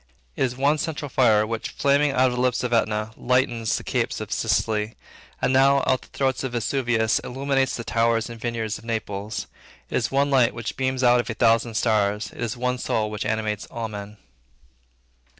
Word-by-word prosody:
It - - -6
is 125 -1 0
one 145 +3 +2
central 150 -1 -3
fire, 110 -5 +4
which, 115 0 -4
flaming 140 +1 +2
now 130 - +1
out 130 -1 +4
of 125 - -4
the - - 0
lips 125 -1 +1
of 125 -1 -1
Etna, 110 -1 +1
lightens 120 -3 +1
the - - -7
capes - - -1
of - - -7
Sicily; 105 0 0 0.4
and, - - +1
now 135 +1 +5
out - - -4
of 130 - +1
the - - -16
throat 135 -1 -1
of 130 -2 -3
Vesuvius, 120 -1 +1
illuminates 135 0 -1
the 115 - -5
towers 115 -1 +1
and 115 -1 -10
vineyards 115 -3 -3
of - - -17
Naples. 110 -2 -4 0.5
It - - +1
is 115 - 0
one 140 +1 +1
light 125 -3 +3
which 115 -2 -5
beams 130 0 -1
out 125 0 +5
of 120 +1 -2
a 115 - -3
thousand 115 0 +2
stars. 105 -2 +1
It - - -11
is 120 0 -2
one 125 +1 -1
soul 105 -3 -1
which 105 -1 -3
animates 110 -1 -2
all 115 -1 -5
men. 105 0 -8
120 Hz, 205 wpm, -24 LUFS, 110-130 Hz, 0.5 s, now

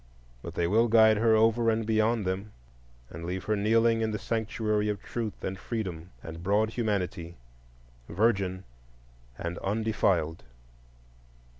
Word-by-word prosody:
But - - -8
they 85 - +1
will 110 +7 +3
guide 110 -1 +6
her 110 0 +4
over 115 +1 +3
and 110 0 0
beyond 110 0 +1
them, 95 +3 -3 0.6
and 85 - -8
leave 90 +2 -4
her 110 - 0
kneeling 115 +2 +3
in 110 - 0
the 105 - -2
Sanctuary 105 -1 -1
of 105 -1 -2
Truth 110 -1 -5
and 95 +1 -4
Freedom 90 -8 -5
and 80 +1 -8
broad 105 +4 +1
Humanity, 95 -7 -2 0.7
virgin 95 -1 +1 0.7
and 85 +1 -4
undefiled. 95 -6 0
105 Hz, 135 wpm, -28 LUFS, 95-110 Hz, 0.7 s, guide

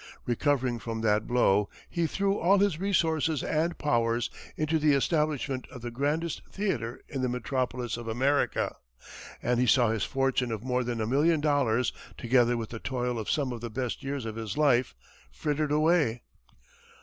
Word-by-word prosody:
Recovering 125 -1 +1
from 115 -1 -4
that 105 -1 +1
blow, 105 -4 +3 0.2
he 170 -2 -1
threw 195 +3 0
all 195 +1 +4
his 195 -5 +2
resources 160 -6 +1
and 165 +2 0
powers 115 -4 +1 0.3
into 155 +1 +1
the 150 -1 +4
establishment 145 -2 0
of 125 - -10
the 120 - -4
grandest 150 +6 -1
theatre 130 - -2
in 135 - -4
the 130 - 0
metropolis 125 0 -2
of 120 -1 -7
America, 135 +5 +1 0.7
and 120 0 +1
he 125 - +2
saw 120 -2 +4
his 110 -3 -1
fortune 135 -2 0
of 110 -1 -4
more 125 0 0
than 120 -2 -3
a - - 0
million 150 +7 +3
dollars, 140 -5 +1 0.2
together 120 0 +3
with 115 -2 -4
the 115 - -6
toil 125 -1 -2
of 110 - -4
some 140 -4 0
of 120 -2 -6
the 120 - -4
best 125 +1 -3
years 135 -2 -3
of 110 0 -5
his 110 0 -5
life 130 -5 +3 0.4
frittered 145 - -1
away. 150 -6 +2
130 Hz, 175 wpm, -28 LUFS, 120-150 Hz, 0.7 s, all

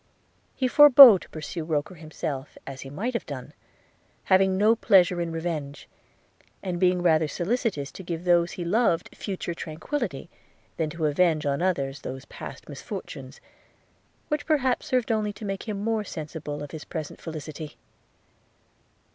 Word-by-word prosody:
He 260 - 0
forebore 270 -6 +10
to - - -14
pursue 160 +1 -6
Roker 155 +3 -2
himself, 155 -4 -6
as 135 -1 -8
he 135 - -8
might 210 - -3
have 235 - -3
done; 135 -4 -7 0.7
having 190 0 +3
no 215 +3 +4
pleasure 180 -5 +4
in 170 -1 -3
revenge, 160 -4 -4 0.8
and 180 -2 -3
being 180 -1 +2
rather 160 -2 +3
solicitous 175 - -2
to - - -10
give 170 -2 -5
to - - -15
those 175 -1 +3
he 175 - -5
loved 195 -2 +1
future 185 -3 -4
tranquillity, 165 - -4 0.5
than 160 -2 -1
to 160 0 -3
avenge 155 0 +2
on 140 +2 0
others 140 -7 -1
those 130 +1 -7
past - - -10
misfortunes, - - -8 0.9
which 300 -1 -2
perhaps 265 -5 +1
served 250 -4 0
only 215 -1 0
to 210 - -9
make 195 +2 -4
him 205 -2 -3
more 225 -1 0
sensible 150 -4 -6
of 145 - -8
his 155 -2 -7
present 155 -4 -7
felicity. 155 -1 -7
175 Hz, 155 wpm, -26 LUFS, 155-205 Hz, 0.9 s, forebore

